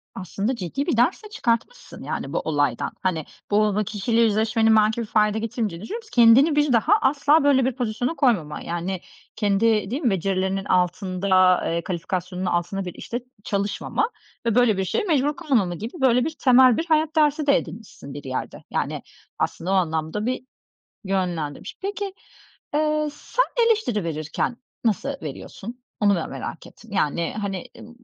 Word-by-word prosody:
Aslında 195 +6 -2
ciddi 235 - -3
bir 320 - 0
ders 290 - +2
de 425 - -10
çıkartmışsın, 240 - -2
yani, - - -4
bu - - +1
olaydan. 145 -6 0
Hani, 165 -5 -1 0.3
bu 205 - +4
o 210 +1 0
kişiyle 215 +3 0
yüzleşmenin 220 0 +3
belki 215 +2 +3
bir 230 - -3
fayda 210 0 +2
getirmeyeceğini 215 -5 -3
düşünmüyorsun 455 - -6
ki - - -14
kendini 250 +6 +6
bir 295 -3 +3
daha 230 - +4
asla 285 +2 +3
böyle 265 -3 +4
bir 260 -2 -1
pozisyona 245 +4 -2
koymama, 210 - +1
yani, 175 +2 -3 0.3
kendi, 210 0 +2
değil 275 - -2
mi, 255 - +2
becerilerinin 190 0 -1
altında, 185 0 +2
eee, 170 0 -1
kalifikasyonun 180 +1 -3
altında 180 +2 -1
bir 180 - -5
işte 240 +1 -5 0.2
çalışmama 200 - -1 0.4
ve 230 -1 +1
böyle 245 -5 +4
bir 190 - 0
şeye 455 - 0
mecbur 295 -5 +1
kalmama 245 - +1
gibi, 220 +7 -6
böyle 250 -1 +4
bir, 315 0 -3
temel 255 -2 +6
bir 330 - -1
hayat 315 -1 +1
dersi 300 -1 +2
de 280 - +6
edinmişsin 200 -10 -8
bir 145 - -8
yerde. 130 -1 -5
Yani, - - -2 0.4
aslında 175 +3 -2
o - - +2
anlamda 160 +2 0
bir 255 +1 -2 0.6
yönlendirmiş. 180 -7 -3
Peki, 400 0 -3 0.6
eee, 305 0 +1
sen - - -1 0.2
eleştiri 415 - +1
verirken 160 +8 -2 0.3
nasıl 225 +5 +1
veriyorsun? 240 +5 -8 0.2
Onu 205 -1 +4
ben 170 - -3
merak - - -7
ettim. 230 -2 -17
Yani, 170 -2 0
hani, 195 -3 -3
ııı, - - -11
215 Hz, 165 wpm, -23 LUFS, 185-265 Hz, 0.6 s, kendini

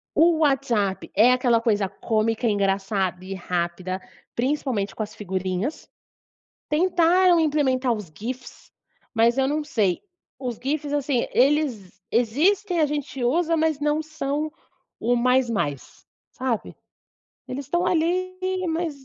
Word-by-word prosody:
O 330 0 +5
WhatsApp 250 -10 +1
é 225 +5 +6
aquela 245 -2 +2
coisa 210 -4 +1
cômica, 225 +3 0
engraçada 195 -2 0
e 190 +1 -6
rápida, 180 0 -3 0.4
principalmente 250 -6 -1
com 220 - -2
as 210 - -8
figurinhas. 190 - -3 0.8
Tentaram 350 +2 +4
implementar 270 -5 +2
os 210 -8 -5
GIFs, 245 +3 -7 0.4
mas 230 +3 +3
eu 265 - +3
não 300 +2 0
sei, 215 -11 0 0.4
os 250 -3 -4
GIFs, 290 +2 -2
assim, 280 -4 0
eles 250 -9 +1
existem, 335 - +2
a 305 - +4
gente 275 -3 -3
usa, 330 +6 +2
mas 315 -2 +1
não 295 +1 +1
são 305 0 -3 0.5
o 245 +1 +2
"mais 250 +1 +3
mais", 145 - -3 0.3
sabe. 255 -5 -3 0.7
Eles 270 +2 -5
estão 345 +6 0
ali, 365 +2 +1 0.3
mas 325 -2 -1
255 Hz, 125 wpm, -24 LUFS, 215-305 Hz, 0.8 s, é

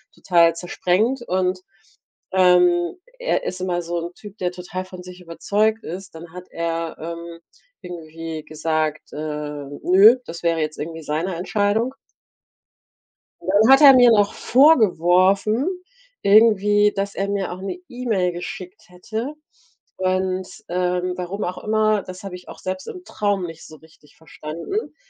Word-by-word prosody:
total 170 -2 +3
zersprengt 185 +8 0
und, 185 -3 -1 0.7
ähm, 180 - +4 0.2
er - - 0
ist 185 0 -4
immer 180 -1 -1
so 170 +1 -3
'n 170 +1 -6
Typ, 205 -1 -12
der 180 -1 -1
total 180 +1 -6
von 185 -1 -11
sich 180 0 -12
überzeugt 210 +6 -1
ist. 185 +1 -8
Dann 165 0 -11
hat 180 0 -10
er, 165 0 -3
ähm, 170 +1 -7 0.4
irgendwie 165 -2 -7
gesagt, 155 0 -2
äh, - - -7 0.7
nö, 200 +7 +7
das 170 +1 -8
wäre 165 -1 +1
jetzt 155 0 -3
irgendwie 160 +1 -6
seine 165 +5 -2
Entscheidung. 205 +7 0 1.5
Und - - -6
dann 215 +4 +5
hat 270 +2 +7
er 280 -2 +10
mir 245 -2 +7
noch 205 -2 +3
vorgeworfen 215 - +3 0.6
irgendwie, 210 -1 +5
dass 200 0 -3
er 200 +1 -2
mir 200 -2 -2
auch 180 +1 -7
'ne 195 - -5
E-Mail 230 -8 -1
geschickt 180 +1 -8
hätte 220 +10 -6 0.6
und, 185 0 -1 0.2
ähm 180 0 -1
warum 185 +3 -4
auch 180 +1 -5
immer, 215 -1 +1
das 185 +1 -10
habe 195 -2 -6
ich 180 - -13
auch - - -10
selbst 185 0 -5
im 365 - -8
Traum 205 -3 -1
nicht 165 -1 -10
so 155 - -13
richtig 155 -1 -22
verstanden, 160 - -6
185 Hz, 150 wpm, -21 LUFS, 170-205 Hz, 1.5 s, er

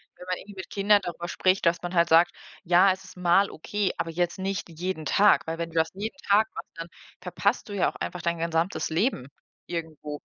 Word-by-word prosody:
wenn 180 - -12
man 185 - -1
irgendwie 205 0 -12
mit 185 -2 -8
Kindern 205 +1 +3
darüber 175 0 -5
spricht, 185 +2 +1
dass 170 0 +2
man 175 0 -5
halt 170 -1 +4
sagt: 165 +2 +6 0.3
„Ja, 180 +2 +5
es 190 0 -5
ist 190 - -14
mal 180 +3 +3
okay, 200 +3 -2
aber 165 - -2
jetzt 175 +3 -1
nicht 195 -1 -3
jeden 170 0 -4
Tag.“ 205 +5 +4
Weil 165 0 -3
wenn 170 0 -3
du - - -17
das 160 0 +2
jeden 215 +8 -5
Tag 210 +2 +5
machst, - - -7
dann 165 0 -6 0.3
verpasst 200 +6 -1
du - - -6
ja 195 - +2
auch - - -26
einfach 180 - -5
dein 170 0 -1
gesamtes 165 +2 -1
Leben 160 - 0 0.4
irgendwo. 155 -3 -5
175 Hz, 220 wpm, -26 LUFS, 165-195 Hz, 0.4 s, sagt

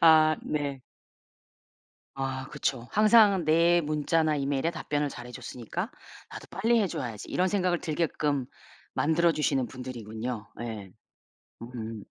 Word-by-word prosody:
아 155 -1 +7
네. 145 -3 -2 1.4
아 130 0 -3
그쵸. 125 -3 -2
'항상 210 -3 +6
내 170 +2 +4
문자나 155 +1 +1
이메일에 140 +3 0
답변을 145 -3 -1
잘해줬으니까 125 -2 -6 0.4
나도 - - -9
빨리 230 +6 +2
해줘야지.' 120 - -3
이런 185 +1 +1
생각을 180 -3 +1
들게끔 150 -4 0 0.5
만들어주시는 155 -5 +2
분들이군요. 120 -3 -6
예. 110 -5 -6 0.7
음. 115 -3 -6
145 Hz, 260 characters per minute, -28 LUFS, 125-165 Hz, 1.4 s, 아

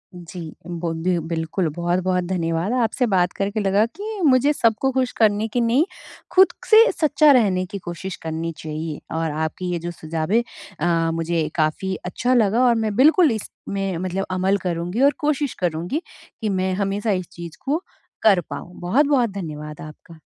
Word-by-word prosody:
जी, 175 0 -9 0.3
बोदय 170 0 -1
बिल्कुल 165 +2 -1
बहुत-बहुत 180 +1 0
धन्यवाद, 170 +3 -1
आपसे 235 +3 +1
बात 180 -1 +3
करके 200 +2 -2
लगा 200 +2 +3
कि 415 - -7
मुझे 270 +1 +5
सबको 235 +1 +1
ख़ुश 255 -1 0
करने 215 0 +3
की 240 +2 -1
नहीं, 245 +8 +3 0.5
खुद 380 0 +7 0.2
से 450 +1 +8
सच्चा 305 -2 +4
रहने 195 -8 +3
की 190 +2 -6
कोशिश 175 +1 -6
करनी 160 +1 -3
चाहिए। 155 0 -5 0.2
और 160 -1 -1
आपकी 160 +4 -3
ये 175 - -1
जो 175 - -2
सुझावे 160 +5 -1
है 240 - +2 0.4
अ, 165 0 +1
मुझे 165 -1 -1
काफ़ी 170 +4 0
अच्छा 245 +8 0
लगा 230 +1 +3
और 240 -1 +4
मैं 220 -2 -1
बिल्कुल 310 - +5
इसमें 195 -3 -4
मतलब 185 +2 -2
अमल 190 +2 +1
करूँगी 175 +6 -2
और 285 +1 +5
कोशिश 295 -2 0
करूँगी 175 - -1 0.4
कि 215 - -1
मैं 185 -1 0
हमेशा 205 +2 -1
इस 185 -2 -1
चीज़ 170 -3 -9
को 300 +6 0 0.4
कर 200 -5 +5
पाऊँ। 145 +5 -7
बहुत-बहुत 250 +6 +2
धन्यवाद 150 -6 -7
आपका। 160 +2 -12
185 Hz, 165 wpm, -22 LUFS, 170-235 Hz, 0.5 s, से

